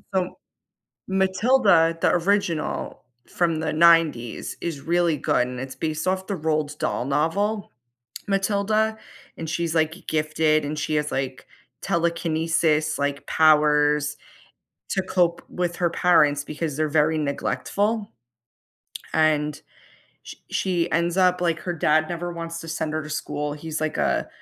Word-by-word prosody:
So 185 Hz, -1 st, -1 dB, 0.7 s
Matilda, 190 Hz, -3 st, +3 dB
the -, -, +3 dB
original 175 Hz, -3 st, -1 dB, 0.2 s
from 170 Hz, -2 st, 0 dB
the 160 Hz, -, -2 dB
90s 160 Hz, -8 st, +3 dB
is 165 Hz, -5 st, -3 dB
really 170 Hz, 0 st, +1 dB
good 125 Hz, -1 st, +1 dB
and 125 Hz, 0 st, -6 dB
it's 130 Hz, 0 st, -6 dB
based 155 Hz, +1 st, -3 dB
off 190 Hz, 0 st, 0 dB
the 200 Hz, -, -2 dB
Roald 155 Hz, -2 st, -2 dB
Dahl -, -, -1 dB
novel, 195 Hz, +9 st, -1 dB, 0.6 s
"Matilda," 210 Hz, +2 st, +1 dB, 0.4 s
and 160 Hz, -1 st, -5 dB
she's 170 Hz, -1 st, -1 dB
like 160 Hz, 0 st, +2 dB
g 185 Hz, -, -15 dB
gifted, 155 Hz, -1 st, +1 dB
and 150 Hz, +1 st, -4 dB
she 155 Hz, +1 st, -1 dB
has, 150 Hz, 0 st, -1 dB
like, 130 Hz, -1 st, -4 dB, 0.3 s
telekinesis, 165 Hz, -3 st, 0 dB
like, 140 Hz, 0 st, -2 dB
powers 150 Hz, -2 st, +3 dB, 0.7 s
to 190 Hz, -, 0 dB
cope 175 Hz, -2 st, +1 dB
with 175 Hz, -1 st, -2 dB
her 175 Hz, -2 st, +1 dB
parents 150 Hz, -5 st, +3 dB
because 150 Hz, -1 st, -4 dB
they're 155 Hz, 0 st, 0 dB
very 155 Hz, +1 st, +2 dB
neglectful. 205 Hz, +9 st, -1 dB, 1.0 s
And 150 Hz, -1 st, +1 dB, 0.6 s
sh -, -, -9 dB, 0.2 s
she 180 Hz, -3 st, 0 dB
ends 170 Hz, +2 st, +1 dB
up 180 Hz, -1 st, +3 dB
like, 170 Hz, -2 st, +1 dB
her 175 Hz, -, -3 dB
dad 155 Hz, 0 st, +2 dB
never 175 Hz, 0 st, -4 dB
wants 165 Hz, 0 st, -6 dB
to 165 Hz, -, -9 dB
send 160 Hz, -1 st, -3 dB
her 155 Hz, 0 st, -2 dB
to 150 Hz, -, -9 dB
school, 150 Hz, -1 st, -3 dB
he's 155 Hz, 0 st, -5 dB
like 155 Hz, 0 st, -2 dB
a 70 Hz, -3 st, 0 dB
160 Hz, 145 wpm, -24 LUFS, 150-175 Hz, 1.0 s, Matilda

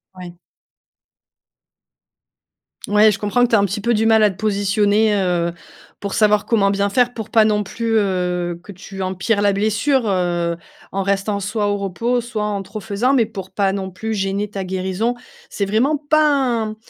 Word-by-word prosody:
Ouais. 175 Hz, -1 st, -10 dB, 2.5 s
Ouais, 210 Hz, +1 st, +5 dB
je 195 Hz, -, -4 dB
comprends 215 Hz, +4 st, +1 dB
que -, -, +4 dB
tu 225 Hz, -, +3 dB
aies -, -, +6 dB
un 200 Hz, -, +3 dB
petit 200 Hz, +2 st, -3 dB
peu 235 Hz, +2 st, +1 dB
du 220 Hz, +1 st, +1 dB
mal 220 Hz, -1 st, +5 dB
à 210 Hz, -, +5 dB
te 190 Hz, -, -14 dB
positionner, 205 Hz, +1 st, +2 dB
heu, 175 Hz, -3 st, 0 dB, 0.5 s
pour 200 Hz, -1 st, -5 dB
savoir 210 Hz, -1 st, +3 dB
comment 205 Hz, -4 st, +2 dB
bien 200 Hz, 0 st, 0 dB
faire. 245 Hz, +3 st, +2 dB
Pour 220 Hz, -2 st, -7 dB
pas 220 Hz, -1 st, +5 dB
non 210 Hz, -1 st, +1 dB
plus, 225 Hz, +2 st, -1 dB
heu, 180 Hz, -3 st, -1 dB
que 205 Hz, -, -10 dB
tu 195 Hz, +1 st, -9 dB
empires 190 Hz, +3 st, -1 dB
la 205 Hz, -1 st, +3 dB
blessure, 220 Hz, +5 st, +1 dB
heu, 175 Hz, -3 st, 0 dB, 0.4 s
en 195 Hz, 0 st, -1 dB
restant 200 Hz, +1 st, -1 dB
soit 205 Hz, +1 st, -1 dB
au 205 Hz, -, +1 dB
repos 230 Hz, +6 st, -1 dB
soit 225 Hz, -3 st, -4 dB
en 205 Hz, -2 st, -2 dB
trop 210 Hz, +3 st, -8 dB
faisant, 225 Hz, +6 st, 0 dB
mais 235 Hz, -5 st, +3 dB
pour 190 Hz, -2 st, -8 dB
pas 195 Hz, 0 st, 0 dB
non 190 Hz, -1 st, -4 dB
plus 220 Hz, +4 st, -4 dB
gêner 200 Hz, +1 st, -2 dB
ta 195 Hz, -2 st, -5 dB
guérison. 190 Hz, +6 st, -2 dB, 0.3 s
C'est 200 Hz, -, -2 dB
vraiment 245 Hz, +9 st, +1 dB
pas 305 Hz, +1 st, +2 dB
un 235 Hz, -6 st, 0 dB
205 Hz, 190 wpm, -19 LUFS, 195-220 Hz, 2.5 s, aies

